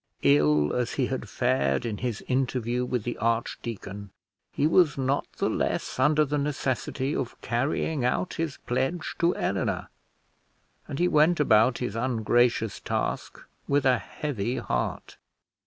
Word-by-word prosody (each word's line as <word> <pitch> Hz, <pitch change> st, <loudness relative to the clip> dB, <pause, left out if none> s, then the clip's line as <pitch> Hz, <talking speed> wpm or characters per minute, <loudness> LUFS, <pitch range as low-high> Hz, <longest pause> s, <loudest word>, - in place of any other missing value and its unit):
Ill 75 Hz, +1 st, +4 dB
as 125 Hz, -1 st, -1 dB
he 135 Hz, -, +1 dB
had 130 Hz, +1 st, -4 dB
fared 125 Hz, -1 st, +1 dB
in 110 Hz, -3 st, -3 dB
his 120 Hz, -4 st, -3 dB
interview 125 Hz, -2 st, 0 dB
with 125 Hz, -3 st, -2 dB
the 120 Hz, -, -4 dB
archdeacon, 115 Hz, -3 st, -3 dB, 0.4 s
he 145 Hz, -, 0 dB
was 160 Hz, -1 st, +4 dB
not 135 Hz, +1 st, -1 dB
the -, -, -1 dB
less -, -, -2 dB
under 150 Hz, +3 st, +4 dB
the 145 Hz, +1 st, -1 dB
necessity 140 Hz, -1 st, -1 dB
of 120 Hz, -, -4 dB
carrying 135 Hz, +4 st, -1 dB
out 125 Hz, +9 st, 0 dB
his 160 Hz, -4 st, -3 dB
pledge 135 Hz, +7 st, -1 dB
to 170 Hz, +1 st, +3 dB
Eleanor; -, -, -1 dB, 1.0 s
and 140 Hz, -, -5 dB
he 175 Hz, -, +3 dB
went 155 Hz, +1 st, +4 dB
about 120 Hz, -3 st, +4 dB
his 125 Hz, -3 st, -3 dB
ungracious 115 Hz, -2 st, +1 dB
task -, -, -3 dB, 0.3 s
with 140 Hz, -1 st, +2 dB
a 130 Hz, -1 st, +4 dB
heavy 125 Hz, -5 st, -3 dB
heart. -, -, -3 dB
125 Hz, 140 wpm, -27 LUFS, 115-145 Hz, 1.0 s, Ill